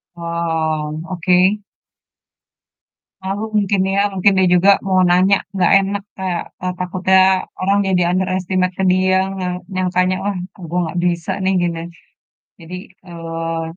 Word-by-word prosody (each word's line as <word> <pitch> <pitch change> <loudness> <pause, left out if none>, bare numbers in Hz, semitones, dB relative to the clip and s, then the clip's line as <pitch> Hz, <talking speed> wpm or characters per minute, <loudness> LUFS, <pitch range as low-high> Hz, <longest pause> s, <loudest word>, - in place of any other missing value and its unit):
Oh, 160 -2 -2
oke. 185 +3 +2 1.6
Malu 195 +3 -3
mungkin 200 -1 +1
ya, 200 - +1
mungkin 195 +1 +3
dia 190 - +4
juga 180 +3 +4 0.2
mau 185 -1 +2
nanya 185 +3 +4 0.2
nggak 185 -2 +2
enak, 195 +1 -1 0.2
kayak 185 -2 -2 0.2
ntar 180 0 -2
takutnya 185 +1 +1 0.4
orang 195 +2 +1
jadi 180 -2 +2
underestimate 185 0 -1
ke 190 - -1
dia, 185 0 +2 0.3
yang 180 0 -2 0.2
yang 185 -1 0
tanya, 185 +1 +2
"Wah, 200 -2 -1 0.2
e - - -20
gue 180 +1 -1
nggak 175 +2 -4
bisa 170 -1 -1
nih, 190 +1 +2
gini." 170 -1 -1 0.8
Jadi, 170 +2 -9 0.3
eee, 165 -1 -4
185 Hz, 140 wpm, -18 LUFS, 170-190 Hz, 1.6 s, dia